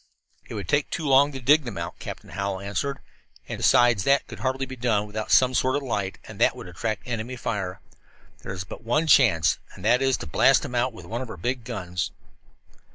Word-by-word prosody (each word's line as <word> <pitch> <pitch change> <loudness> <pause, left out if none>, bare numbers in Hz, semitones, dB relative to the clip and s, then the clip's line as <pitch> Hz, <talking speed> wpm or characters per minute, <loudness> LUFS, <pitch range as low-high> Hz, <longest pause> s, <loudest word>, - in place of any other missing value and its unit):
"It - - -6
would - - -5
take 145 -1 +1
too 160 - -3
long 140 +2 +5
to 135 - -6
dig 145 +5 +4
them 120 -7 -6
out," 85 0 -5
Captain - - -8
Hallowell 100 -1 -3
answered. 120 +8 -2 0.5
"And, - - -5
besides, 120 -5 +4
that 140 +4 +3
could - - -9
hardly 130 0 -1
be 130 0 -8
done 115 -4 +1
without 105 +1 -5
some 130 0 +5
sort 130 +1 +2
of 145 - -1
light, 100 -7 -2
and - - -10
that - - +4
would - - -9
attract 100 +4 -3
enemy 120 0 -4
fire. 95 -6 -4 0.6
There - - -7
is 95 -1 -4
but 95 - -10
one 120 +8 +1
chance, 120 - +4 0.2
and 90 - -10
that 120 +4 +4
is 135 -1 +2
to - - -7
blast 75 - +4
them - - -6
out 125 +1 +1
with 110 - -12
one 115 +2 -4
of 130 - -6
our - - -7
big 125 0 -2
guns!" 90 -7 -3
120 Hz, 225 wpm, -25 LUFS, 100-130 Hz, 0.6 s, long